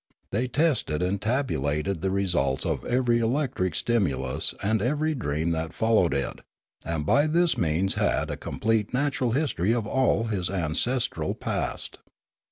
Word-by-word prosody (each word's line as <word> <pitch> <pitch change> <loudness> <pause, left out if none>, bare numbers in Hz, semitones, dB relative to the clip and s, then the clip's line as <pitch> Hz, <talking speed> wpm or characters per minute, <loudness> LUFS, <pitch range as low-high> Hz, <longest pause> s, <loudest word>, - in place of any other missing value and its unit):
They 120 +6 0
tested 125 - +1
and 95 +2 -1
tabulated 95 - -1
the 95 - 0
results 85 -9 0
of - - -1
every 120 -1 +2
electric 115 - 0
stimulus 70 - 0
and 110 +1 +1
every 150 +6 0
dream 80 - -1
that 80 -1 -2
followed 110 -8 +2
it, 70 -1 -2 0.4
and 80 -3 -2
by 145 - +4
this 170 +2 +3
means 85 +4 +1
had - - 0
a - - -2
complete 110 +1 -1
natural 130 -3 0
history 120 - +1
of 115 -3 -1
all 130 0 +2
his 100 -6 -1
ancestral 100 +8 -1
past. - - -3
105 Hz, 145 wpm, -26 LUFS, 85-125 Hz, 0.4 s, by